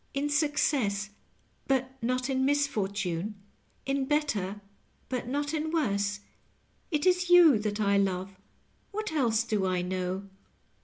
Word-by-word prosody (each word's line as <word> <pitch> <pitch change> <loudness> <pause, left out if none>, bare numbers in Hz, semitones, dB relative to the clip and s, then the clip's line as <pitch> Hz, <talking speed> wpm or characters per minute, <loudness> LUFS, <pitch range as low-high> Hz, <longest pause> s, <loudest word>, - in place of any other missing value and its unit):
"In 290 +1 -1
success, 270 -9 +1 0.6
but 265 -1 0
not 250 +2 0
in 265 -1 0
misfortune 210 -9 0 0.5
2 270 - -1
In 270 - -1
better, 220 -10 -1 0.5
but 250 -2 -3
not 290 +3 -2
in 315 0 -1
worse? 205 -10 0 0.7
It 300 -2 0
is 360 -1 +3
you 340 -9 +7
that 210 0 -2
I 200 -1 +3
love 190 0 -1 0.3
— - - -39
^what 430 -3 -2
else 235 -7 +2
do 210 -4 0
I 180 -1 0
know?" 185 +1 -3
240 Hz, 140 wpm, -29 LUFS, 200-290 Hz, 0.7 s, you